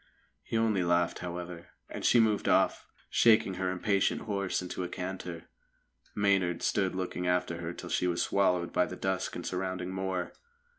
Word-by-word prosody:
He 115 - -2
only 110 -5 +2
laughed, 85 0 +1
however, 90 -1 -6 0.2
and - - -7
she 120 - +5
moved 110 -2 +2
off, - - +2 0.2
shaking 110 -4 +5
her 95 - +1
impatient 95 +2 +1
horse 100 -3 -1
into 90 0 -4
a 90 - -4
canter. 90 -2 -5 0.7
Maynard 95 -4 +2
stood 95 -3 +1
looking 90 -1 -3
after 90 -1 0
her 85 0 -4
till - - -8
she 90 - +1
was 85 -1 +1
swallowed 90 -3 +1
by 90 - +3
the 90 - -6
dusk 95 0 -2
and - - -5
surrounding 95 0 -3
moor. 95 -1 -2
90 Hz, 165 wpm, -30 LUFS, 90-95 Hz, 0.7 s, she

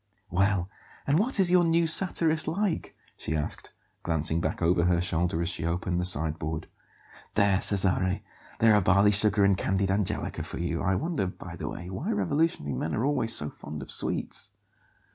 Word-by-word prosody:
"Well, 95 0 +1 0.4
and 145 +4 +2
what 230 +2 +3
is 180 -2 +3
your 180 -1 +5
'new 165 0 +2
satirist' 160 -1 +4
like?" 180 +2 -2 0.2
she 80 - -4
asked, 75 -1 -4 0.3
glancing 80 0 -1
back 80 - -3
over 85 0 +2
her 90 -1 +2
shoulder 85 -1 0
as 85 - 0
she 85 - -2
opened 85 +1 -2
the 90 - -1
sideboard. 80 -2 0 0.7
"There, 100 -2 +2
Cesare, 95 -1 +3 0.3
there 115 -1 +4
are 105 - +4
barley 100 +3 +4
sugar 105 0 +2
and 100 -1 +3
candied 95 0 -1
angelica 100 -1 -2
for - - -6
you. 85 -1 -3
I 95 0 0
wonder, 155 - -2
by 90 - -9
the - - -6
way, 90 +2 -8
why 95 - -5
revolutionary 100 - -1
men 75 +5 -3
are 115 - -1
always 135 -6 0
so 75 -1 -1
fond 75 -1 -9
of - - -9
sweets." - - -2
95 Hz, 180 wpm, -27 LUFS, 85-115 Hz, 0.7 s, your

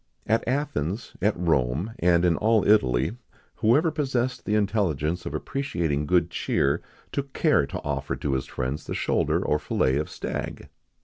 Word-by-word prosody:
At 115 +2 +2
Athens, 115 - -2
at 105 +1 +2
Rome, 80 - 0
and 85 0 +4
in 85 -2 +3
all 110 -1 +2
Italy, 65 - +3 0.4
whoever 145 +9 +3
possessed 130 -4 -1
the 105 - +1
intelligence 90 -6 0
of - - -4
appreciating 85 - -2
good 85 -1 +2
cheer, - - +1 0.3
took 140 -1 -4
care 150 - +3
to - - -5
offer 70 -1 -2
to 70 - -2
his 65 - -1
friends 65 +4 -4
the - - -3
shoulder - - +1
or 75 - +2
fillet 65 -2 +1
of 75 - -2
stag. - - -5
90 Hz, 160 wpm, -26 LUFS, 75-115 Hz, 0.4 s, and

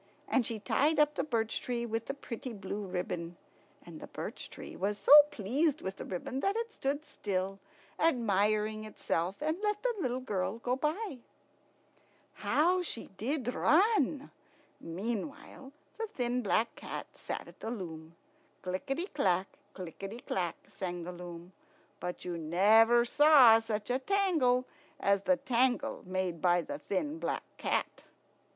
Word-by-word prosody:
And 255 -5 +2
she 230 - -3
tied 290 +10 +2
up 300 0 +4
the - - -1
birch 230 -6 -1
tree 240 -1 -2
with 225 0 -3
the 275 - -3
pretty 250 -2 -6
blue 200 0 -5
ribbon. 180 -2 -4 0.5
And - - -10
the - - -9
birch - - -7
tree - - -9
was 205 +2 -1
so - - 0 0.2
pleased 270 +9 0
with 190 +1 -4
the - - -6
ribbon 190 +8 -4
that 390 +7 +1
it 460 0 -3
stood 285 +3 -2
still, 195 -4 -3 0.4
admiring 215 -5 +2
itself, 185 -4 -2
and 315 +4 -1
let 420 0 -1
the - - +2
little 255 -3 0
girl 210 -4 -2
go 245 +2 -1
by. 305 - -2 1.1
How 360 +4 +2
she 305 -9 -4
did 250 - -2
run! 315 - +3 0.5
Meanwhile 235 - -5 0.3
the 450 - -1
thin 250 - -1
black 225 +1 +1
cat - - -6
sat - - -6
at - - -15
the 225 - -5
loom. 165 -7 -7 0.5
Clickety 270 - -2
clack, 185 - +1 0.3
clickety 195 +4 -7
clack, 175 -7 -2
sang 175 -2 -5
the 180 - -5
loom; 175 0 -9 0.5
but 180 0 -5
you 175 -2 -3
never 220 +9 +5
saw 265 -4 +7
such 220 0 -3
a 255 - +1
tangle 300 -8 +2 0.3
as 200 -1 +2
the 275 +6 +3
tangle 255 -2 +1
made 185 -3 -2
by 175 -1 +3
the 145 - -6
thin 290 - -2
black - - -2 0.2
cat. - - -1
230 Hz, 150 wpm, -32 LUFS, 190-280 Hz, 1.1 s, saw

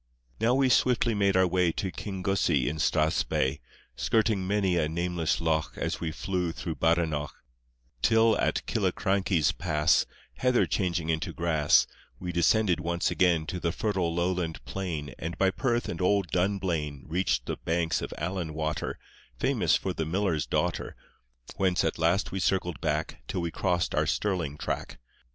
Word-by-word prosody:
Now 115 +3 +3
we 135 0 +3
swiftly 125 -1 +3
made 100 -2 +2
our 95 - +5
way 90 -1 +2
To 95 - -3
Kingussie 95 - 0
in 75 - -2
Strathspey, 75 -3 +1 0.4
Skirting 110 -4 +1
many 100 -3 +1
a 80 -3 +1
nameless 85 -1 -1
loch 80 -2 -1
As - - -2
we 80 -2 -2
flew 90 +1 -2
through 80 -1 -5
Badenoch, 80 -3 +1 0.7
Till 115 0 +4
at - - 0
Killiecrankie's 95 -6 +1
Pass, 80 -2 +2 0.3
Heather 125 -1 +3
changing 85 -4 -1
into 80 0 -2
grass 80 -3 +3 0.3
We 90 -1 -4
descended 90 +1 +3
once 85 +1 -1
again 85 -4 +2
To 90 - -4
the 85 -1 0
fertile 95 -3 -1
lowland 85 -1 -2
plain, 80 -8 -4
And 80 +2 -4
by 95 -1 +3
Perth 120 +1 0
and 85 - -4
old 95 -1 +2
Dunblane 90 -7 -1
Reached 90 +5 0
the - - -3
banks 80 -1 0
of - - -5
Allan 85 -1 -3
Water, 80 -2 -2 0.4
Famous - - +2
for - - -2
the 80 - -3
miller's 90 -3 0
daughter, - - -1 0.6
Whence 95 -2 +2
at - - -1
last 85 +5 +2
we 95 - -3
circled 90 -3 0
back 80 -1 -2
Till 90 - -2
we 85 -1 -2
crossed 90 -1 0
our - - +1
Stirling 90 -8 -1
track. - - -4
85 Hz, 155 wpm, -28 LUFS, 80-95 Hz, 0.7 s, our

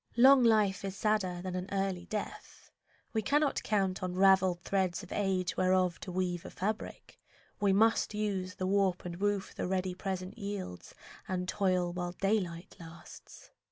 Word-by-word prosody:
Long 265 +2 +8
life 215 -5 +3
is 195 0 -4
sadder 190 -5 0
than 185 -1 -4
an 185 +1 -4
early 195 -2 -2
death. 215 -1 -6 0.4
We 220 - +1
cannot 290 +7 +1
count 195 -3 0
on 180 -1 -3
ravelled 190 -2 +4
threads 190 -1 0
of 185 - -12
age 190 -3 0
Whereof 185 -1 +2
to 185 - -7
weave 180 -1 -2
a - - -8
fabric. 215 +5 -5 0.4
We 200 -2 +3
must 220 +2 +3
use 195 -3 -2
The 185 - -3
warp 190 -2 +1
and 170 -1 -5
woof 205 0 -1
the - - -3
ready 185 0 -1
present 190 +2 -5
yields 200 - -6 0.3
And 180 -1 -2
toil 180 -2 +1
while 175 0 -3
daylight 185 -3 -2
lasts. 165 -1 -13
190 Hz, 160 wpm, -31 LUFS, 180-205 Hz, 0.4 s, Long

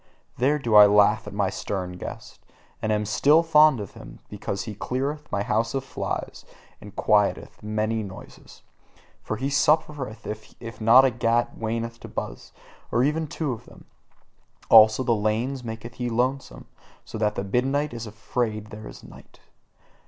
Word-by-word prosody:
There 140 +4 +3
do 120 -6 -2
I 105 -1 +10
laugh 105 +2 +3
at - - -6
my 100 -2 0
stern 95 -3 -4
guest, - - -9 0.4
and 110 - -1
am 105 0 0
still 145 +9 +4
fond 155 -5 +5
of 100 - -6
him; - - -12
because 100 - -4
he 110 - -6
cleareth 140 +8 -4
my 100 -1 0
house 115 +4 0
of 135 - -1
flies, - - -5 0.4
and 105 -1 -12
quieteth 105 -1 +1
many 110 +1 -1
little 95 -3 -7
noises. - - -15 0.6
For 110 - -4
he 135 +4 -2
suffereth 135 -4 0
it 110 0 -5 0.4
not 120 +5 +7
if 130 - +1
a 120 - -14
gnat 115 +1 +2
wanteth 115 +1 -4
to - - -10
buzz, - - -7 0.4
or 120 - +2
even 155 +3 0
two 150 -1 -3
of 115 - -7
them; - - -16 0.8
also 110 +2 +7
the 120 - +2
lanes 115 +5 -1
maketh 115 +1 -7
he 120 -1 -3
lonesome, 125 - -2 0.4
so 110 - -7
that 105 -1 0
the - - -2
moonlight 135 +7 0
is 115 -1 -6
afraid 110 -1 -3
there 105 +1 -9
at - - -12
night. - - -16
115 Hz, 170 wpm, -25 LUFS, 105-130 Hz, 0.8 s, I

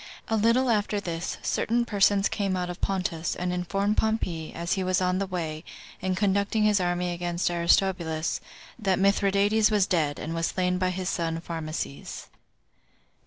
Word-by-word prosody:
A 225 - +2
little 230 +4 +3
after 210 -1 +1
this, 170 -3 -4
certain 235 +1 +1
persons 200 -2 +3
came 195 -3 -1
out 180 -1 -2
of 175 - -10
Pontus, 185 -4 -1
and 180 0 -2
informed 195 +4 0
Pompey, 185 -8 -1
as 170 0 -2
he 190 - -1
was 185 0 +1
on 180 0 +1
the 195 - -1
way, 160 -4 -4 0.4
and 185 -1 -1
conducting 200 +2 +1
his 210 -1 +4
army 175 0 0
against 175 0 -1
Aristobulus, 170 -2 +1 0.4
that 195 -4 +1
Mithridates 200 +2 +3
was 210 -3 +3
dead, 155 -6 0
and 160 - -4
was 165 0 0
slain 180 -1 0
by 185 0 +1
his 185 0 -3
son 165 -2 -1
Pharmaces. 160 -4 -5
185 Hz, 165 wpm, -27 LUFS, 170-200 Hz, 0.4 s, his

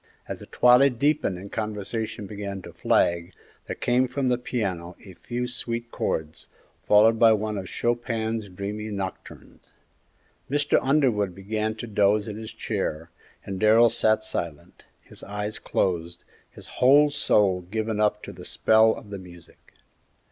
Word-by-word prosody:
As - - -6
the - - -11
twilight 125 +1 +5
deepened 145 -8 +1
and 100 +2 -10
conversation 110 0 -4
began 100 -1 -6
to - - -11
flag, 85 +1 +1 0.3
there - - -4
came 125 +1 +1
from 130 +1 -1
the 125 - +2
piano 95 -8 -3
a 95 - -11
few 120 +6 -4
sweet 120 -1 -4
chords, 80 0 -3 0.3
followed 110 +2 +5
by 115 -1 +7
one 110 0 -2
of 95 -2 -5
Chopin's 115 -2 -2
dreamy 105 +3 -5
nocturnes. 100 -2 -7 0.9
Mr. 145 +1 +2
Underwood 125 - +1
began 110 +3 -2
to 115 - -7
doze 105 -1 +2
in 105 - -5
his 110 0 -7
chair, 80 +2 -4 0.3
and 95 -1 -5
Darrell 110 +2 +6
sat 110 -1 +2
silent, 85 -3 -6 0.2
his - - -11
eyes 105 +1 -4
closed, 85 -1 -2 0.3
his - - -13 0.2
whole 145 +3 +6
soul 100 -10 +2
given 110 0 -2
up 105 0 +1
to - - -7
the - - -11
spell 110 0 +3
of 105 - -12
the 100 - -5
music. 85 -2 -16
110 Hz, 150 wpm, -25 LUFS, 95-120 Hz, 0.9 s, by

